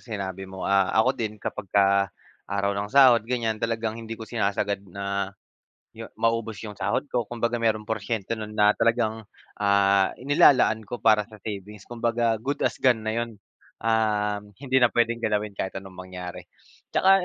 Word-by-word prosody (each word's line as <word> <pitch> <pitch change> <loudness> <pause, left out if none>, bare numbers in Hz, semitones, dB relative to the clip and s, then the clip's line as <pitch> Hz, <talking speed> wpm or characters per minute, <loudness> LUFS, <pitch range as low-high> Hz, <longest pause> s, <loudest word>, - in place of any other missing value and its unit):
sinabi 95 -4 -6
mo. 95 0 -7
Ah, 100 -1 +3
ako 115 +4 +4
din, 110 -5 -4
kapagka 100 -1 +1 0.4
araw 100 0 0
ng 100 +1 -3
sahod, 130 -3 +7
ganiyan, 115 -3 -1
talagang 115 -1 -1
hindi 115 0 -7
ko 110 - -8
sinasagad 100 -3 -1
na, 100 +1 -3 0.6
'yo - - -9
maubos 115 -1 0
'yong 105 -2 -8
sahod - - 0
ko, 120 - +1
kumbaga 120 0 -1
merong 110 -2 +1
porsyento 110 -1 -2
no'n 105 0 -7
na 105 0 +5
talagang, 115 -1 +1 0.4
ah, 100 -1 +3
inilalaan 130 -4 +5
ko 120 - -4
para 110 -1 +5
sa 110 - -13
savings. 105 -1 -7
Kumbaga, 115 -1 0
good 140 +5 -3
as - - 0
gone 125 -4 +3
na 110 - -1
'yon, 115 -2 -5 0.5
um, 105 -2 +1 0.2
hindi 130 -2 0
na 120 - +6
puwedeng 115 0 +1
galawin 105 -2 -1
kahit 95 - -3
anong 95 -1 -13
mangyari. 90 -1 -8 0.5
'Tsaka, 190 - +4
110 Hz, 165 wpm, -25 LUFS, 100-115 Hz, 0.6 s, sahod